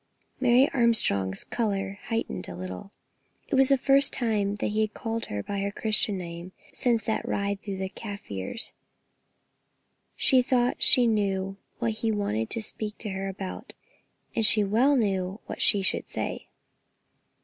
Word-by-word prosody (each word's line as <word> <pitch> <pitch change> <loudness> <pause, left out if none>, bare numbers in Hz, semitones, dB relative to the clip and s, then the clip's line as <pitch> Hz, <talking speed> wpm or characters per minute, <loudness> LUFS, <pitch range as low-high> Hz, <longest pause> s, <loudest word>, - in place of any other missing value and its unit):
Mary 255 +1 +5
Armstrong's 160 - +2
colour 200 -4 -2
heightened 225 - -3
a 90 - -7
little. 95 - -7 0.6
It - - -5
was 265 0 +5
the 275 - +5
first 275 +1 +5
time 210 -4 0
he 215 +2 0
had 215 -1 -1
called 225 -1 -4
her 105 0 -4
by 200 -1 -4
her 200 +1 -1
Christian 215 -1 +1
name 170 0 -7 0.2
since 230 -4 +1
that 220 - -1
ride 200 0 -2
through 200 -2 -5
the 190 0 -3
Kaffirs. 200 - -5 1.4
She 260 -2 +4
thought 250 -1 +1
she 250 - +6
knew 195 -3 0 0.2
what 235 -1 0
he 225 - +1
wanted 115 - -1
to 230 - -2
speak 210 0 -4
to 215 - -6
her 195 0 -3
about, 190 -1 -7 0.6
and 225 - +1
she 215 0 +6
well 235 +8 +3
knew 195 -4 0
what - - -6
she 200 -2 +4
should - - 0
say. - - -4
210 Hz, 155 wpm, -27 LUFS, 190-230 Hz, 1.4 s, she